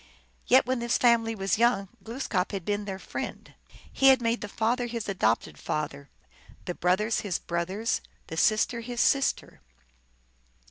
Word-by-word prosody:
Yet 260 +1 +6
when 255 0 -1
this 235 0 +1
family 230 -2 +3
\vas 195 0 0
young, 235 -4 +3 0.2
Glooskap 225 -6 -2
had 190 -4 -4
been 205 0 -1
their 195 -2 -4
friend; - - -7 0.4
he 270 - +4
had 265 -1 +7
made 230 0 0
the 210 - -4
father 240 +4 0
his 230 -2 -4
adopted 150 - 0
father, 140 -2 -4 0.6
the 180 - -3
brothers 190 +6 +1
his 195 -5 -2
brothers, 185 +7 -2 0.2
the - - -7
sister 215 +6 +2
his 240 +1 -6
sister. 275 +2 +1
220 Hz, 150 wpm, -27 LUFS, 190-235 Hz, 0.6 s, had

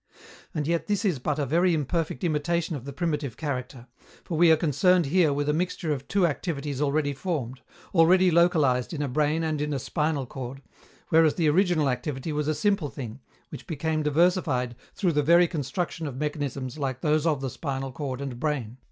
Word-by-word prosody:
And 150 -2 -1
yet 170 +2 -1
this 205 0 0
is 175 -9 +1
but 145 +3 -1
a 145 - 0
very 170 +5 +2
imperfect 155 -2 -2
imitation 165 +1 0
of 130 -3 -7
the 140 - -5
primitive 150 -5 -2
character, 130 -4 -4 0.4
for 170 - -4
we 170 +1 +5
are 160 - +6
concerned 170 +3 +3
here 160 +1 +3
with 145 +1 -1
a 150 - +2
mixture 165 -1 -1
of 140 -1 -6
two 195 -2 +2
activities 145 -3 -2
already 145 0 +1
formed, 135 -5 -4 0.3
already 180 +2 +5
localized 160 -7 +3
in 150 -2 -2
a - - -1
brain 150 +4 +1
and 155 -2 -1
in 150 -1 -1
a - - 0
spinal 150 +1 -1
cord, 135 +2 -7 0.5
whereas 160 -1 +4
the 165 -3 +1
original 175 -3 +2
activity 135 +3 -2
was 150 0 -1
a 155 - +1
simple 200 -6 +1
thing, 125 -3 -7 0.3
which - - -10
became 160 -1 -1
diversified 150 -5 +1 0.2
through 185 -4 +1
the 150 -2 +2
very 170 +4 +5
construction 160 +1 -3
of 130 -3 -6
mechanisms 145 -2 -3
like 130 -3 -3
those 155 +1 +2
of 150 -4 +1
the 135 -2 -3
spinal 135 -2 -4
cord 135 -1 -5
and 130 -4 -5
brain. 130 -5 -2
150 Hz, 195 wpm, -26 LUFS, 135-165 Hz, 0.5 s, are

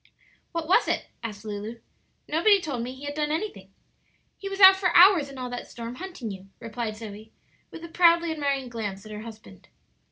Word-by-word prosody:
"What 335 -2 -4
was 365 - +4
it?" - - -2
asked 215 -2 -7
Lulu; 215 +2 -6 0.5
"nobody 390 +6 +4
told 285 -9 -4
me 250 +2 -5
he 265 - -13
had 285 - -4
done 300 0 -1
anything." 335 +8 -4 0.7
"He 395 - -5
was 390 0 -6
out 380 -1 +10
for 380 -1 +1
hours 350 -5 +7
in 275 - -11
all 250 -1 -5
that 245 - -6
storm, 235 0 -7
hunting 350 - -6
you," 190 0 -10
replied 230 -1 -5
Zoe, 215 0 -10 0.4
with 330 - -11
a - - -6
proudly 340 0 +4
admiring 280 -4 -1
glance 210 -5 -6
at 215 - -10
her 210 0 -7
husband. 215 - -12
260 Hz, 195 wpm, -26 LUFS, 220-335 Hz, 0.7 s, out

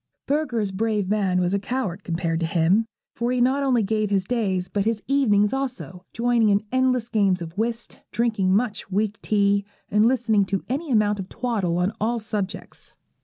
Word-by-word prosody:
Bürger's 245 -9 0
Brave 210 0 -1
Man 195 -3 +1
was 180 +1 0
a 200 - +2
coward 205 -4 -3
compared 165 -1 -1
to 165 - -1
him; 180 +7 +2 0.3
for 240 +1 -1
he 250 - 0
not 260 +3 +2
only 255 -5 +2
gave 215 0 0
his 195 -2 +1
days, 190 -6 -1
but 200 - -1
his 225 -1 -1
evenings 215 -7 +3
also, 250 -10 -4
joining 235 -2 +2
in 205 0 +2
endless 255 -2 +1
games 200 -5 +2
of 165 0 -7
whist, 230 +2 -3
drinking 215 -4 +1
much 210 0 0
weak 205 +1 -1
tea, 200 -1 +2 0.3
and 210 +2 +4
listening 235 -5 +2
to 195 0 -2
any 285 +6 -3
amount 210 -4 +2
of 190 0 -6
twaddle 215 -9 -1
on 180 +3 0
all 235 +3 +1
subjects. 210 -3 -5
210 Hz, 180 wpm, -24 LUFS, 195-235 Hz, 0.3 s, and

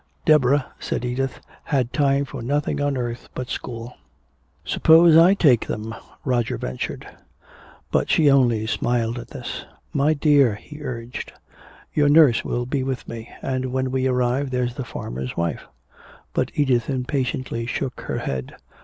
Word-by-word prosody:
Deborah, 145 -3 +4
said 125 - -3
Edith, 130 +1 -2 0.3
had 130 -4 0
time 140 -1 +2
for 135 -2 -7
nothing 145 +4 -1
on 145 -1 0
earth 120 -1 -4
but 125 -1 -5
school. 115 0 -6 0.7
"Suppose 165 0 +6
I 170 +4 +7
take 135 - +4
them," 110 +1 -4 0.3
Roger 120 -4 0
ventured. 60 +1 -5 0.8
But - - +1
she 155 - +4
only 120 -6 +4
smiled 120 +1 0
at - - -9
this. - - -6 0.3
"My 145 +3 +2
dear," 140 -6 +4
he 150 +8 -12
urged, 120 -3 -6 0.6
"your 145 -1 +3
nurse 145 -5 +6
will 120 0 -2
be 135 +2 -1
with 130 -1 -3
me, 115 0 -7
and 130 -1 -2
when 130 0 -1
we 130 0 +1
arrive 125 +2 +1
there's 125 -1 -1
the 130 - -5
farmer's 65 - -6
wife." 85 -1 -2 0.7
But - - 0
Edith 130 -5 +2
impatiently 130 -3 -2
shook 130 +1 -3
her - - -3
head. 65 -1 -4
130 Hz, 150 wpm, -23 LUFS, 120-140 Hz, 0.8 s, I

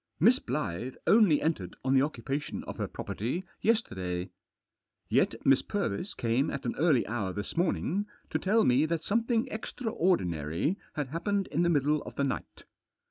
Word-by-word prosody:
Miss 240 +8 +6
Blyth 125 - -3
only 205 -9 +5
entered 105 - -1
on 130 0 +2
the 135 - +5
occupation 140 0 -3
of - - -7
her - - -2
property 130 - -3 0.2
yesterday. 95 - 0 0.8
Yet - - +3
Miss 135 -1 +5
Purvis 195 - -2
came 120 +5 +1
at - - -5
an 120 - 0
early 155 -6 +4
hour 105 -5 -2
this 100 +1 -5
morning 185 +3 0 0.2
to - - 0
tell 215 +4 +3
me 130 +5 +4
that 165 0 -1
something 230 +3 +1
extraordinary 165 - -1 0.2
had 145 -3 -2
happened 195 +6 -1
in 155 - +1
the 175 - +3
middle 150 -1 +2
of - - -9
the 140 - 0
night. 135 - -4
150 Hz, 160 wpm, -30 LUFS, 120-190 Hz, 0.8 s, Miss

